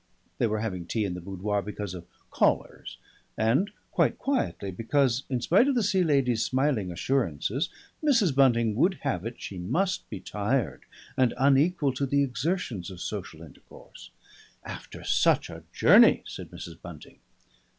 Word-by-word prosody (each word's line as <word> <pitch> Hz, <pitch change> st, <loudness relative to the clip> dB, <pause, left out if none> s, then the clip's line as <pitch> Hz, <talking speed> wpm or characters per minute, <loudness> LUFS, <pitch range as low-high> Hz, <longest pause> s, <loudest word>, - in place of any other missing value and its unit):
They 120 Hz, -, +3 dB
were 110 Hz, 0 st, -1 dB
having 90 Hz, -6 st, -4 dB
tea 110 Hz, +3 st, -1 dB
in 95 Hz, -, -3 dB
the 90 Hz, -, -6 dB
boudoir, 100 Hz, +3 st, -2 dB
because 105 Hz, -2 st, -6 dB
of 85 Hz, -2 st, -9 dB, 0.2 s
callers, -, -, 0 dB, 0.4 s
and 130 Hz, -, +2 dB, 0.2 s
quite -, -, +2 dB
quietly 260 Hz, -, -2 dB
because, 125 Hz, +5 st, +1 dB
in 125 Hz, -3 st, -1 dB
spite 195 Hz, -, +4 dB
of 280 Hz, -, +2 dB
the 240 Hz, -, +2 dB
Sea 190 Hz, -2 st, +2 dB
Lady's 135 Hz, -7 st, +2 dB
smiling 130 Hz, -8 st, 0 dB
assurances, 120 Hz, -, -1 dB, 0.3 s
Mrs. 235 Hz, -, +3 dB
Bunting 120 Hz, -5 st, +3 dB
would 180 Hz, -, +3 dB
have 115 Hz, -8 st, -1 dB
it 120 Hz, -, -8 dB
she 95 Hz, -, -7 dB
must 180 Hz, -, -1 dB
be -, -, -6 dB
tired 105 Hz, +7 st, -2 dB, 0.3 s
and 130 Hz, -2 st, +2 dB
unequal 140 Hz, +2 st, +3 dB
to 140 Hz, +2 st, -2 dB
the 140 Hz, +1 st, +2 dB
exertions 135 Hz, -, -2 dB
of 95 Hz, -2 st, -10 dB
social 90 Hz, -5 st, -6 dB
intercourse. 75 Hz, -, -15 dB, 0.5 s
"After -, -, -9 dB
such -, -, +2 dB
a -, -, -10 dB
journey," -, -, +6 dB
said -, -, -8 dB
Mrs. 85 Hz, -1 st, -10 dB
Bunting. 85 Hz, -4 st, -12 dB
120 Hz, 155 wpm, -27 LUFS, 100-145 Hz, 0.5 s, journey